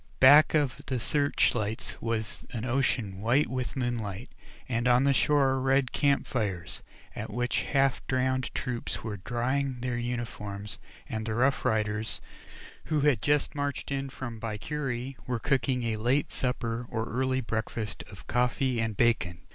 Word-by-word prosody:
Back 145 +4 +8
of 145 -5 +1
the 130 - 0
searchlights 120 -5 0
was 115 -1 -2
an 115 -1 -3
ocean 120 -6 0
white 125 +7 +3
with 130 -1 -3
moonlight, 120 -4 -3 0.4
and 120 -1 0
on 125 +1 +5
the 140 0 +4
shore 135 -1 +3
red 135 -1 +2
camp 140 -2 +2
fires, 95 -8 -3 0.3
at - - -5
which 125 +3 0
the - - -3
half 135 -2 +2
drowned 130 0 +1
troops 120 -2 -3
were 105 -3 -4
drying 130 +5 -1
their 125 -1 -1
uniforms, 105 -4 -4 0.3
and 110 0 -3
the 110 - -1
Rough 130 +3 +2
Riders, 110 0 0 0.7
who 155 -2 +1
had 140 -7 +3
just 150 +4 +2
marched 145 -1 -3
in 135 0 -2
from 120 -4 -6
Baiquiri, 125 +3 -3
were 125 -1 0
cooking 130 -1 +1
a 115 -2 -1
late 125 +6 +1
supper, 120 -2 -1
or 110 -2 -1
early 130 +2 0
breakfast 110 -1 -3
of 100 - -12
coffee 125 0 +1
and 110 -3 -2
bacon. 105 -8 +2
125 Hz, 155 wpm, -29 LUFS, 110-135 Hz, 0.7 s, Back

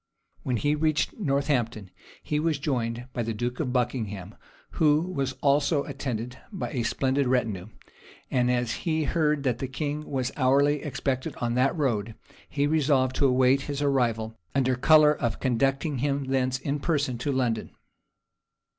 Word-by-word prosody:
When 125 -2 -1
he 145 +6 +1
reached 155 0 +1
Northampton, 135 - -1 0.3
he 150 - -1
was 160 -1 +1
joined 125 -5 -2
by 120 - -2
the 115 -1 -2
duke 120 +3 -3
of 135 -5 -1
Buckingham, 110 -6 -2 0.4
who 150 -2 +3
was 140 -7 -2
also 140 +1 +3
attended 130 -3 -5
by 195 - -4
a 130 -5 -1
splendid 135 +3 0
retinue; 110 -7 0 0.6
and 125 -1 +2
as 120 -2 +1
he 160 -2 0
heard 150 -2 +1
that 125 -3 0
the 135 - -2
king 150 +3 -4
was 130 -2 -1
hourly 140 +2 +3
expected 130 -2 -3
on 120 -1 -2
that 130 +6 +2
road, 115 -7 -1 0.3
he 145 0 0
resolved 140 -4 +2
to 140 - +4
await 130 +1 +3
his 140 -1 -2
arrival, 120 -6 0 0.2
under 130 -2 +2
color 150 +3 +6
of 120 -6 -2
conducting 135 +3 0
him 140 +1 0
thence 130 -1 0
in 140 +2 -3
person 140 -6 -1
to 140 +4 -1
London. 120 -4 -1
135 Hz, 155 wpm, -26 LUFS, 125-145 Hz, 0.6 s, color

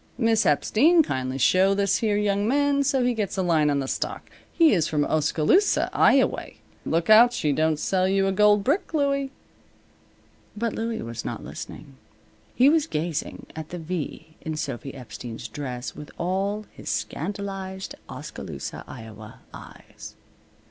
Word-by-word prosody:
Miss 225 -3 +2
Epstein, 300 - +4
kindly 130 - -3
show 185 +8 +4
this 200 -1 +2
here 210 -2 +1
young 205 0 +1
man 285 +2 +2
so 275 -2 +1
he 245 - +2
gets 205 -4 -3
a 190 - +1
line 160 -4 +3
on 145 - +1
the 135 -1 -2
stock. - - -4 0.2
He 330 -3 +5
is 165 -4 +2
from 150 -2 0
Oskaloosa, 155 - +2
Ioway. - - +3 0.3
Look 165 +5 +1
out 235 +3 +8
she 155 -10 0
don't 155 +1 +1
sell 185 +4 +1
you 195 0 +2
a 195 - +1
gold 210 +1 +4
brick, 315 - 0
Louie." 280 -2 +1 1.3
But 230 0 -1
Louie 225 0 -3
was 115 -1 -6
not - - -5
listening. 65 - -9 0.6
He 255 +3 +5
was 315 +1 +3
gazing 160 - -3
at 160 0 -7
the 175 - -6
V 160 -1 -6
in 160 -1 -4
Sophy 135 -2 -4
Epstein's 115 -2 -8
dress 125 -4 -6
with 150 - -9
all 195 +4 -1
his - - -9
scandalized 195 +2 -4 0.2
Oskaloosa, - - -7
Iowa, 110 -3 -11
eyes. - - -12
190 Hz, 155 wpm, -25 LUFS, 150-225 Hz, 1.3 s, out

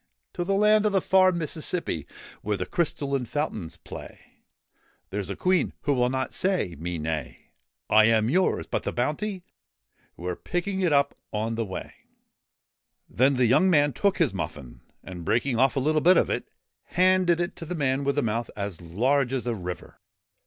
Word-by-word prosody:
} - - -53
To 175 - -2
the 195 +2 0
land 210 +1 +4
of 210 - -1
the 195 - +4
far 185 0 +4
Mississippi 165 - -3 0.3
Where 105 -1 -1
the 90 - -3
crystalline 140 -5 -1
fountains 110 - -4
play; - - -12 0.7
There 100 +2 -2
's 95 - -6
a - - -3
Queen 185 -3 +1
who 145 - +1
will 125 -2 +2
not 130 0 -2
say 185 - 0
me 85 +1 -3
nay.' 75 -5 -5 0.2
' - - -63
I 110 0 +6
am 110 -1 +3
yours! 180 +9 +1
But - - -2
the - - -3
bounty? 175 - -2 0.3
' - - -61
' - - -39
We 85 - -9
're 90 - -1
picking 190 - -3
it 175 -3 +2
up 140 -1 +3 0.2
on 110 +2 -2
the 115 0 -2
way.' 95 - -7 1.1
Then 135 +3 +2
the 125 -1 +3
young 135 +11 +4
man 145 -4 +4
took 200 +9 +1
his 165 - +2
muffin, 70 -9 -6 0.2
and, 90 -2 -8
breaking 120 +6 0
off 135 +2 +3
a - - +2
little 155 +3 +1
bit 180 +4 +6
of - - +2
it, - - -3 0.4
handed 185 -1 +3
it 175 +1 -2
to 165 - -6
the 180 +3 -4
man 140 -3 0
with 140 0 0
the 145 - +1
mouth 115 +1 -1
as 100 -4 -5
large 125 +10 +1
as 130 -2 -2
a 120 - 0
river. 90 -4 -7
135 Hz, 200 wpm, -26 LUFS, 105-175 Hz, 1.1 s, I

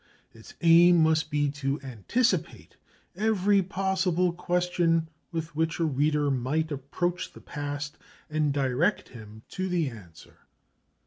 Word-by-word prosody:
Its 110 -1 -15
aim 170 +1 +7
must 160 0 +2
be 145 -1 +1
to 140 0 -2
anticipate 135 - -1 0.4
every 205 -1 +2
possible 185 -2 0
question 175 -2 0 0.2
with 165 -2 -5
which 160 +1 -1
a 165 - +2
reader 145 0 +1
might 140 +5 -1
approach 170 +6 -3
the - - -12
past, 145 0 -6 0.3
and 150 -1 0
direct 140 +7 0
him 110 -2 -12
to 185 0 -4
the 170 -5 0
answer. 85 -9 -15
160 Hz, 125 wpm, -27 LUFS, 140-180 Hz, 0.4 s, aim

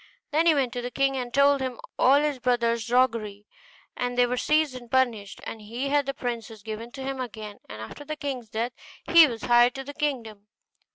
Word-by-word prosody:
Then 320 +3 +3
he 320 - +6
went 260 -4 0
to 245 - -3
the 245 - -4
king, 275 +1 +1
and 250 -2 -3
told 280 +1 +4
him 255 -2 -3 0.2
all 270 +3 +6
his 295 -3 -1
brothers' 235 -2 +1
roguery; 225 -5 +1 0.5
and 245 0 -3
they 245 - +5
were 245 +1 -1
seized 305 +2 +2
and 245 -2 -10
punished, 235 -6 0
and 225 - -7
he 235 +6 -4
had 285 -1 +2
the 275 - -1
princess 230 -4 -5
given 220 +2 -6
to 270 -2 -7
him 270 -1 -3
again; 215 -4 -7
and 110 +1 -7
after 110 - -9
the 305 +1 -5
king's 265 -6 -5
death 230 +3 -2 0.3
he 335 -2 +7
was 230 -4 -6
heir 240 0 +6
to 270 +1 -7
his 285 +2 -8
kingdom. 230 -9 -3
245 Hz, 215 wpm, -26 LUFS, 230-275 Hz, 0.5 s, he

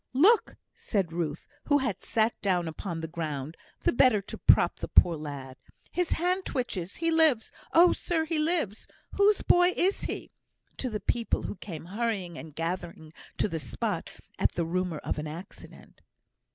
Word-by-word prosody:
"Look!" 390 - +4 0.2
said 190 -7 -2
Ruth, 165 -2 -3 0.2
who 290 - +4
had 250 -9 -2
sat 225 +1 +1
down 180 -4 +1
upon 165 +1 -5
the 160 - -4
ground, 155 -2 -4 0.3
the - - +2
better 240 -3 +5
to 195 - -8
prop - - +4
the - - -5
poor 175 -2 +5
lad, 140 -4 -7 0.3
"his 360 -1 0
hand 365 +3 0
twitches! 200 - -3
he 330 0 0
lives! 315 -8 +4 0.2
oh, 345 +2 +6
sir, 325 -2 -1
he 320 -1 -1
lives! 305 - -1 0.2
Whose 405 +1 +3
boy 355 +1 +5
is 385 +3 +1
he?" - - -5 0.5
(to 255 - -2
the 215 -2 -3
people, 230 +3 0
who - - -4
came 170 -4 -8
hurrying 200 -3 -2
and 160 -2 -10
gathering 165 -1 -4 0.2
to - - +2
the 165 -5 -3
spot 125 -7 -3 0.3
at - - +2
the 170 - -1
rumour 180 -1 -1
of 150 - -3
an 150 - -4
accident). 165 +5 -11
195 Hz, 170 wpm, -28 LUFS, -, 0.5 s, oh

